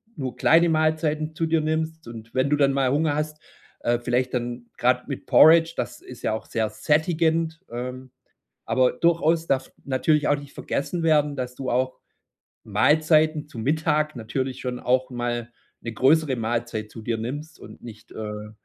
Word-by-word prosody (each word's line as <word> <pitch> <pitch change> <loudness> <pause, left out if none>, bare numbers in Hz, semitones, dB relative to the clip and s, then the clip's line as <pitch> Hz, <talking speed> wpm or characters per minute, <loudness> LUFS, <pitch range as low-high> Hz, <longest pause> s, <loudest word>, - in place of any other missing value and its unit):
nur 130 -6 -4
kleine 170 +6 +4
Mahlzeiten 155 0 0
zu 165 - 0
dir 160 -1 +2
nimmst 160 -1 -2
und 115 -1 -10
wenn 130 +2 +1
du 150 - +3
dann 140 -1 +3
mal 135 -2 +1
Hunger 150 +1 +1
hast, 150 0 -3 0.4
äh 120 0 +1
vielleicht 125 +1 -1
dann 120 0 -3
grad 125 0 +1
mit 140 - -6
Porridge, 165 +1 +6
das 120 0 -4
ist 125 - -12
ja 110 - 0
auch 110 - -5
sehr 110 -2 -1
sättigend, 160 +1 +1
ähm, 125 +2 -6 0.6
aber 130 -1 +3
durchaus 165 +2 +2
darf 130 -1 -1
natürlich 145 +3 +1
auch 145 - +3
nicht 145 -1 -11
vergessen 170 +5 -3
werden, 150 -3 +3
dass 125 -1 -4
du 130 -1 -4
auch 130 +1 0 0.7
Mahlzeiten 155 0 +3
zu 120 - -11
Mittag 155 +4 0
natürlich 130 +3 -3
schon 125 -1 -4
auch 130 +1 +1
mal 120 -1 -3 0.3
'ne 115 - -6
größere 135 +3 +3
Mahlzeit 115 -1 -3
zu 115 - -10
dir 115 +1 -1
nimmst 145 +7 -6
und - - -13
nicht, 110 -1 -12
äh, 105 -1 -6
135 Hz, 170 wpm, -24 LUFS, 120-155 Hz, 0.7 s, Porridge